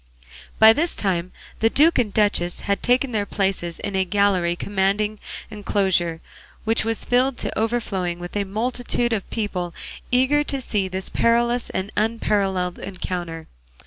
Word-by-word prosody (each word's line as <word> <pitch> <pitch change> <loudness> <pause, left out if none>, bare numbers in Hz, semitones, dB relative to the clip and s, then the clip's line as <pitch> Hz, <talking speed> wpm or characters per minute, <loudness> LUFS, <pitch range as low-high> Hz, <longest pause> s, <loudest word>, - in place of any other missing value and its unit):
By 220 0 +8
this 330 +7 0
time 185 -3 -1 0.3
the 225 - +4
duke 305 +6 +4
and 220 -4 +1
duchess 195 -4 +1
had 200 0 -1
taken 250 +2 +2
their 205 -3 -1
places 190 -4 -1
in 200 - -4
a 190 - +3
gallery 190 -3 +2
commanding 205 +3 0 0.3
the 215 - -10
enclosure, 185 -5 0 0.4
which 225 +1 +2
was 225 0 0
filled 250 +1 +2
to - - -3
overflowing 215 -6 -1
with 175 +2 -8
a 205 - +1
multitude 240 +3 -1
of 205 -4 -3
people 180 -6 -3 0.3
eager 260 +4 +3
to 275 -2 -3
see 205 -6 -1
this 190 0 -2
perilous 235 +1 +1
and 190 +2 -3
unparalleled 200 -5 0
encounter. 175 -3 -5
205 Hz, 150 wpm, -22 LUFS, 185-230 Hz, 0.4 s, By